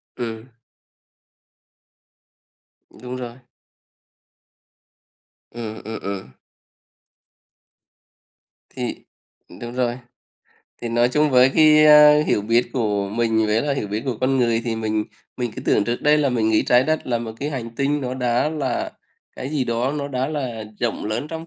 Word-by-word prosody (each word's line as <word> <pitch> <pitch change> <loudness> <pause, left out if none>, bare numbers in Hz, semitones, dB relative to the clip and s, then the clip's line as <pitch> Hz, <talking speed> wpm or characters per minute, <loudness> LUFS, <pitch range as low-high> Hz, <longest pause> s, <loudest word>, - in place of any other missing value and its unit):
Ừm. 115 -2 -5 2.6
Đúng 125 0 -6
rồi. 120 -2 -6 2.2
Ừm, 110 -2 -7
ừm, 110 0 -5
ừm. 100 -1 -5 2.5
Thì - - -3 0.7
đúng 120 0 -6
rồi, 125 -1 -1 0.8
thì 120 - -3
nói 120 +1 +2
chung 150 +4 +2
với 130 0 +5
cái, 155 -1 +6
a, 150 0 +8
hiểu 100 - +1
biết 115 +3 +1
của 105 -5 -1
mình 110 +1 +1
với 105 +2 +1
là 145 -1 0
hiểu 105 -7 -3
biết 105 +2 -3
của 125 -4 -2
con 135 +1 +2
người 115 -2 +2
thì 115 -2 -2
mình 110 -1 -1 0.3
mình 120 -2 -2
cứ - - -6
tưởng 100 - +2
trước 120 +1 -3
đây 150 +1 +4
là 145 -2 +2
mình 115 -3 +1
nghĩ 110 - +3
Trái 125 +1 +4
Đất 155 0 -1
là 120 -2 0
một 115 -1 -6
cái 145 +2 -2
hành 120 -5 -5
tinh 145 +1 0
nó 125 -1 -3
đã 125 +2 +1
là 140 -6 -2 0.5
cái 130 - -5
gì 145 -4 0
đó, 120 +3 -1
nó 145 -1 -3
đã 130 0 -2
là 125 -8 -4 0.2
rộng 120 -3 -2
lớn 110 +7 -3
trong 165 0 -7
120 Hz, 155 wpm, -22 LUFS, 115-140 Hz, 2.6 s, a